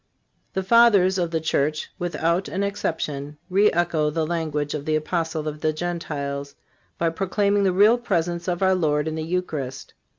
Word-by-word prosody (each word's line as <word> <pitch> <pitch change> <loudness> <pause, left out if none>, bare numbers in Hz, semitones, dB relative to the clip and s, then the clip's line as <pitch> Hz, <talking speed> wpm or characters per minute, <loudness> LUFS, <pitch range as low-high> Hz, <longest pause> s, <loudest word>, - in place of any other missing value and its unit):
The 190 - -1
Fathers 200 -3 +5
of 175 -2 0
the 165 -1 -1
Church, 150 -1 -1
without 170 +1 0
an 195 +2 -2
exception, 150 -7 -3
re 200 +3 +4
echo 165 -3 +1
the 160 +1 -1
language 155 -3 -2
of 150 -2 -4
the 155 - +1
Apostle 160 0 -2
of 150 0 -5
the 155 - +1
Gentiles 145 -4 -4 0.4
by 165 -1 +1
proclaiming 200 +3 +1
the 190 - +3
Real 210 +6 +5
Presence 175 -6 -1
of 180 +1 -1
our 190 0 +4
Lord 150 -4 +1
in 160 - -2
the 160 - -3
Eucharist. 155 -6 -4
165 Hz, 170 wpm, -23 LUFS, 150-185 Hz, 0.4 s, Fathers